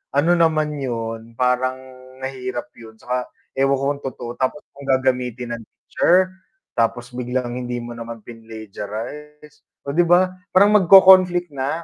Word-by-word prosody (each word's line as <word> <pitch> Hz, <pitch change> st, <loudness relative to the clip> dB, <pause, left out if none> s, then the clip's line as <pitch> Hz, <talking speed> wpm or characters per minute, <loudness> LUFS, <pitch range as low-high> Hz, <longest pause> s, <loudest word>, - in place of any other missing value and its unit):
ano 150 Hz, +5 st, +3 dB
naman 155 Hz, -2 st, +2 dB
'yun 115 Hz, -3 st, -5 dB
parang 125 Hz, +1 st, +1 dB, 0.5 s
mahirap 130 Hz, -2 st, -5 dB
'yun, 115 Hz, -1 st, -13 dB
tsaka 125 Hz, +2 st, -3 dB, 0.3 s
ewan 135 Hz, 0 st, +2 dB
ko -, -, -1 dB
kung -, -, -18 dB
totoo 120 Hz, -2 st, -6 dB
tapos 130 Hz, +3 st, -1 dB
kung 140 Hz, 0 st, -13 dB
gagamitin 125 Hz, -2 st, 0 dB
ng 115 Hz, -, -12 dB
teacher, 185 Hz, +1 st, +1 dB, 0.5 s
tapos 120 Hz, +1 st, 0 dB
biglang 125 Hz, 0 st, -3 dB
hindi 125 Hz, -1 st, -4 dB
mo 120 Hz, -, -8 dB
naman 115 Hz, 0 st, -7 dB
pinlegiarize, 115 Hz, +7 st, -9 dB, 0.2 s
oh -, -, -1 dB
'di 175 Hz, -, +5 dB
ba, 180 Hz, +2 st, +4 dB, 0.2 s
parang 200 Hz, +2 st, +6 dB
magko-conflict 185 Hz, -2 st, +7 dB
na. 135 Hz, 0 st, -2 dB
130 Hz, 140 wpm, -21 LUFS, 120-150 Hz, 0.5 s, magko-conflict